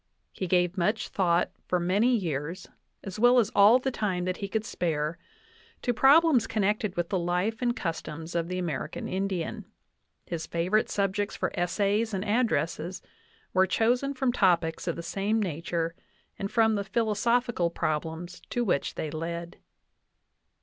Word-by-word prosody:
He 185 - -4
gave 180 +1 +2
much 210 +6 0
thought 180 -2 +1 0.2
for 180 - +1
many 205 +8 +3
years, 165 -4 -3 0.4
as 195 +1 -6
well 245 +2 +6
as 225 -4 +3
all 205 +4 +7
the 265 +1 -2
time 190 -6 -1
that 185 0 -2
he 200 - -4
could 220 +2 -2
spare, 160 -4 -2 0.6
to 245 - +1
problems 280 0 +5
connected 210 -2 0
with 175 -1 -1
the 190 - 0
life 180 +7 -1
and 240 -1 +1
customs 165 -1 -5
of 170 -1 -1
the 180 +1 -3
American 160 -4 -3
Indian; 190 -3 -2 0.6
his 165 -2 -4
favorite 180 +6 +1
subjects 200 0 -1
for 185 - -2
essays 200 +5 0
and 190 +2 -3
addresses 180 - 0 0.5
were 190 0 +4
chosen 245 +8 +1
from 260 -1 +1
topics 175 -6 +2
of 170 - 0
the 170 - -6
same 200 +6 0
nature 170 -2 -2 0.5
and 195 - -2
from 225 0 +3
the 200 -1 0
philosophical 220 -1 +1
problems 160 +2 -3
to 245 - 0
which 175 -10 0
they 155 - -3
led. 170 +2 -5
190 Hz, 155 wpm, -28 LUFS, 170-220 Hz, 0.6 s, all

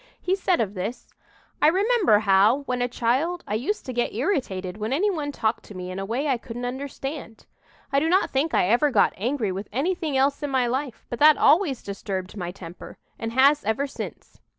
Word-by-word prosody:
He 365 +1 0
said 370 -2 +1
of 205 -3 -1
this: 210 +6 -5 0.5
"I - - +6
remember 385 - +4
how, 205 +6 +4
when 250 -2 -2
a 245 - +2
child, 265 +10 0
I - - -3
used 270 - -2
to 255 - -5
get 240 -3 -1
irritated 210 - -2
when 215 +2 -3
any 400 +9 +2
one 300 -5 -3
talked 225 -4 -1
to 205 - -12
me 180 0 -6
in 185 - -5
a 195 - -3
way 245 +8 -2
I 260 -4 +1
couldn't 240 +1 -6
understand. 270 -1 -6 0.5
"I 275 - +5
do 315 +3 0
not 375 +3 +2
think 285 +4 0
I - - +3
ever 240 +8 +3
got 265 - +3
angry 230 -1 -1
with 195 +3 -6
anything 305 - -1
else 275 +2 +2
in 290 - -2
my 260 -2 +2
life; 255 0 -3
but 240 - -4
that 300 -1 +7
always 295 - +3
disturbed 195 -2 -5
my 180 -4 -4
temper 175 -1 -10 0.2
and 225 0 -4
has 280 +4 +4
ever 220 +6 0
since. 280 - -8
255 Hz, 210 wpm, -24 LUFS, 215-295 Hz, 0.5 s, that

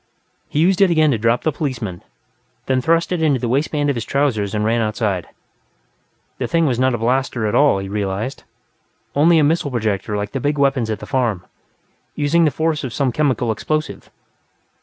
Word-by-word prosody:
He - - -5
used 180 +5 +3
it 195 - +6
again 155 -3 +3
to 115 - 0
drop 115 +2 +1
the 155 - +1
policeman, 120 - -4 0.6
then 130 -1 +1
thrust 165 +5 +1
it 180 -2 -1
into 145 -5 +2
the 120 - -2
waistband 145 +3 0
of - - -3
his 115 - -3
trousers 110 -8 0
and 105 0 0
ran 115 +1 +1
outside. 105 -4 -1 1.1
The - - -1
thing 165 -1 +2
was 125 -5 0
not 130 -1 +2
a - - -2
blaster 120 0 0
at 105 - -1
all, 145 -8 +4
he 95 0 -4
realized 100 +4 -3 0.7
only 165 +4 +4
a 155 - +4
missile 150 0 +1
projector 110 -4 -2
like 105 0 -4
the 135 - -3
big 145 +3 -1
weapons 135 -5 +1
at 110 - -1
the - - -6
farm, 120 -9 -1 0.7
utilizing 155 +3 +2
the - - +4
force 155 +1 -1
of 130 -3 -5
some 135 -3 0
chemical 130 -4 0
explosive. 155 +7 -3
130 Hz, 195 wpm, -19 LUFS, 110-150 Hz, 1.1 s, it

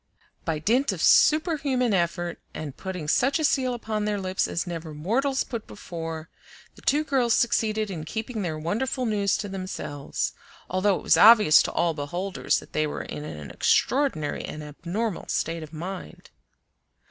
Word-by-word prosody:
By 160 -2 0
dint 230 - +2
of 190 - -5
superhuman 285 - +4
effort, 175 -1 -1 0.2
and 145 -4 -6
putting 180 -5 -5
such 265 - +3
a 315 - -2
seal 260 -4 +2
upon 215 -3 -3
their 210 -1 -1
lips 190 0 0
as 170 - -2
never 165 -3 -6
mortals 260 - 0
put 235 -4 -6
before, 165 -4 -6 0.5
the - - -17
two 295 +3 +2
girls 255 -6 +2
succeeded 215 -3 +1
in 165 -4 -5
keeping 220 +5 -4
their 165 -5 -2
wonderful 235 - -1
news 205 -3 +1
to 205 - -4
themselves; 185 -7 -4 0.3
although 190 +2 +2
it - - -9
was - - +5
obvious 210 -8 +8
to - - -2
all 170 -1 +1
beholders 175 +6 -1
that - - -9
they 155 0 +1
were - - -4
in 75 -1 -6
an 75 -1 -7
extraordinary 250 - +1
and 155 - -6
abnormal 175 +8 -4
state 165 +1 -1
of 155 -1 -9
mind. 180 +4 -7
190 Hz, 165 wpm, -26 LUFS, 160-235 Hz, 0.5 s, obvious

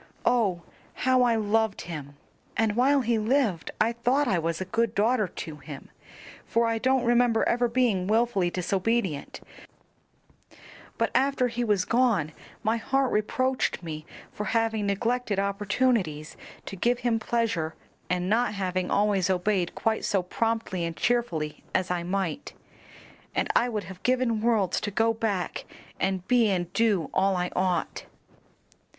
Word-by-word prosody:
Oh, 200 -8 +2 0.4
how 255 -1 +4
I 240 -2 +3
loved 220 +1 +1
him! 150 -4 -7 0.4
and 220 -2 +1
while 270 +3 +4
he 235 -2 +1
lived 220 - +1
I 225 - +3
thought 250 +5 +1
I 190 -6 +2
was 165 0 -2
a 190 - -3
good 225 +3 0
daughter 215 0 +2
to 160 -3 -7
him, 145 -1 -10 0.5
for 230 0 +1
I 230 0 0
don't 260 0 +2
remember 240 -1 +3
ever 245 0 +2
being 230 -6 +1
wilfully 215 -4 +2
disobedient, 185 -2 -1 1.6
but - - 0
after 270 -2 +2
he 240 +1 -2
was 205 -5 +1
gone 230 - +2 0.3
my 220 +2 +1
heart 270 +3 0
reproached 255 +1 0
me 155 -2 -6 0.4
with 210 - -2
having 225 -2 0
neglected 220 +2 0
opportunities 200 -5 0 0.3
to - - -6
give 240 +6 0
him 235 -2 +1
pleasure, 215 -9 -1 0.3
and 180 0 0
not 220 +1 +1
having 185 -2 -2
always 200 -2 +2
obeyed 185 -1 0
quite 220 0 0
so 195 -3 +1
promptly 225 -2 -1
and 165 -1 -4
cheerfully 180 -12 -1
as 185 -1 +1
I 180 -1 0
might, 190 - -3 0.8
and - - +1
I 245 - +3
would 215 -3 -3
have 185 +1 -10
given 250 -3 +1
worlds 215 -6 +1
to 210 - -2
go 225 +3 +2
back 210 -5 -2 0.3
and 190 -1 -1
be 240 -3 +4
and 180 -2 -1
do 205 -9 +1
all 190 0 +2
I 180 0 -1
ought." 180 -2 -1
215 Hz, 150 wpm, -27 LUFS, 180-235 Hz, 1.6 s, how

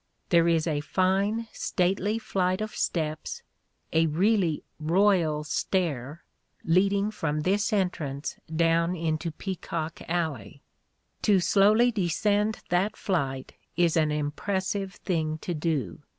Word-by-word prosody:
There 170 -1 +4
is 165 -2 +2
a 155 -3 0
fine 195 +7 +1
stately 195 +4 0
flight 185 -4 0
of 215 0 -4
steps 155 -2 -2 0.2
— - - -24
a 160 0 +4
really 180 0 +1 0.2
royal 165 -2 +2
stair 155 -3 -2 0.2
— - - -31
^leading 200 +4 +2
from 150 -5 -1
this 200 +7 +1
entrance 165 -8 -1 0.2
down 165 +2 +2
into 160 -1 -1
Peacock 165 -2 -5
Alley. 145 - -3 0.6
To 205 -3 +4
slowly 210 +6 +4
descend 205 +2 0
that 190 +4 +1
flight 135 -8 -2 0.2
is 170 -2 +3
an 155 -2 +2
impressive 190 +6 -2
thing 160 -4 -2
to 175 - -2
do. 150 - -2
175 Hz, 120 wpm, -27 LUFS, 155-195 Hz, 0.6 s, There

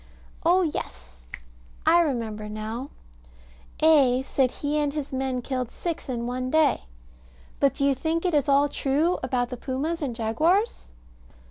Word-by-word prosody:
Oh, 360 +3 +4
yes! 65 - -5 0.6
I 335 +2 +6
remember 225 -9 -1
now 220 +5 -5 0.9
A. 275 -5 +5
said 265 -1 +1
he 290 +4 -2
and 295 -1 0
his 285 -2 -5
men 260 -1 -2
killed 255 -2 -2
six 335 -4 -5
in 235 -2 -2
one 255 +1 -3
day. 310 -2 +2 0.7
But 275 - +3
do 275 - 0
you 280 - +4
think 320 +6 -2
it 355 - +1
is 290 -1 +2
all 280 +1 +5
true 290 +5 0
about 250 -1 -1
the 250 - -5
pumas 290 +7 -3
and 260 -5 -3
jaguars? 315 - +1
275 Hz, 150 wpm, -25 LUFS, 245-310 Hz, 0.9 s, I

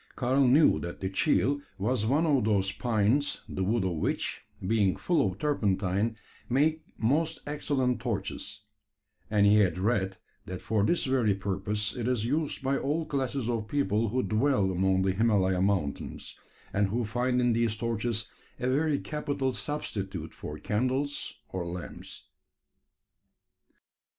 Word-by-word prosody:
Karl 130 +1 +3
knew 135 - +5
that 85 +3 -6
the 95 0 -3
"cheel" 140 +8 +2 0.2
was 110 +2 0
one 145 +7 +3
of 140 -6 +3
those 100 -3 +2
pines, 120 +6 +1
the 95 - -3
wood 110 +2 +1
of 90 -3 -1
which, - - -1 0.2
being 100 -2 +2
full 145 - +1
of 95 -2 -1
turpentine, 105 -4 0 0.3
make 155 +5 +2 0.2
most 155 +8 +1
excellent 140 -4 0
torches; 105 -2 -4 0.7
and 105 -2 +4
he 105 +1 +6
had 95 -5 +3
read, 95 -1 0 0.3
that 90 0 -5
for 110 -2 0
this 170 +11 +2
very 125 -7 +2
purpose 100 +2 -2
it 120 -2 -2
is 125 -4 0
used 145 +2 -1
by 135 +1 +1
all 155 +4 -1
classes 135 -3 -2
of 115 -3 -1
people 110 -4 +1
who 130 +4 0
dwell 110 -3 +2
among 95 +1 +2
the 95 - +2
Himalaya 95 -3 +2
mountains, 95 -7 -1 0.4
and 100 0 +2
who 115 +4 -1
find 125 +3 0
in 120 -1 +3
these 115 -1 +1
torches 115 -1 -2 0.3
a 125 - -1
very 145 +3 +2
capital 140 -4 -2
substitute 95 - -4
for 75 - -7
candles 130 - -1
or 95 -2 -3
lamps. 85 0 -7
110 Hz, 145 wpm, -29 LUFS, 100-135 Hz, 0.7 s, he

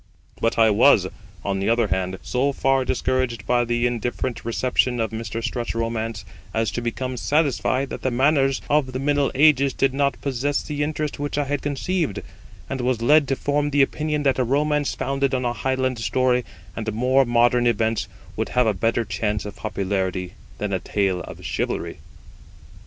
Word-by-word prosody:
But 115 - +1
I 110 -1 +5
was, 110 -2 +5 0.4
on 100 -1 -1
the 100 - 0
other 115 -2 +2
hand, 95 0 -1
so 135 +3 0
far 135 0 +2
discouraged 130 -3 -1
by 120 +1 +2
the 120 0 0
indifferent 120 0 -2
reception 125 +1 +1
of 110 -1 -1
Mr. 115 0 -4
Strutt's 120 -1 -3
romance 115 -2 -3 0.3
as 110 -2 +1
to 120 - -3
become 125 +2 -3
satisfied 135 -2 +1
that - - -5
the 130 - 0
manners 135 +1 +2
of 140 -3 +1
the - - -2
middle 145 0 +1
ages 140 -2 +4
did 135 -1 +1
not 140 0 0
possess 140 +1 -1
the 150 -1 -4
interest 150 -1 -2
which 145 0 -3
I 145 - +2
had 145 0 -2
conceived; 145 - -2 0.4
and 135 -1 -3
was 125 -2 0
led 150 +3 +5
to 135 - +1
form 145 +2 0
the 145 -1 +4
opinion 150 +1 -1
that 135 -2 +2
a - - +3
romance 145 +3 +1
founded 135 0 0
on 125 -1 -1
a 120 - 0
Highland 130 0 -1
story 125 +1 +1 0.3
and 110 0 -3
more 130 +4 +3
modern 120 0 +3
events 115 -1 +1 0.3
would - - -2
have 125 -1 +2
a 110 - +2
better 115 +4 0
chance 105 0 -2
of 105 - -7
popularity 95 -3 -2 0.2
than 105 -1 -3
a 95 - +1
tale 95 -3 0
of 85 +2 -10
chivalry. 75 - -3
125 Hz, 180 wpm, -23 LUFS, 115-140 Hz, 0.4 s, I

